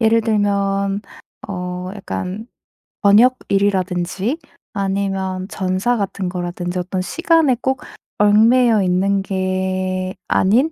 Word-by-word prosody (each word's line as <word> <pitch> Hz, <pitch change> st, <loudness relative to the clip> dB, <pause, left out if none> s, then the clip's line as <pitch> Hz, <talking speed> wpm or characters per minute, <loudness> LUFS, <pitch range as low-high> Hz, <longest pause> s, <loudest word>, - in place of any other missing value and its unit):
예를 225 Hz, 0 st, +4 dB
들면 200 Hz, -2 st, 0 dB, 0.5 s
어 180 Hz, -1 st, -4 dB
약간 205 Hz, +2 st, -5 dB, 0.5 s
번역일이라든지 200 Hz, -, +2 dB, 0.3 s
아니면 195 Hz, -1 st, -2 dB
전사 190 Hz, +6 st, 0 dB
같은 195 Hz, -2 st, -3 dB
거라든지 175 Hz, 0 st, -4 dB
어떤 185 Hz, +1 st, -2 dB
시간에 325 Hz, -, +2 dB
꼭 265 Hz, +3 st, -1 dB, 0.4 s
얽매여 220 Hz, +2 st, +5 dB
있는 190 Hz, +2 st, +1 dB
게 185 Hz, -1 st, -2 dB
아닌 240 Hz, +12 st, +3 dB
195 Hz, 220 characters per minute, -19 LUFS, 185-215 Hz, 0.5 s, 얽매여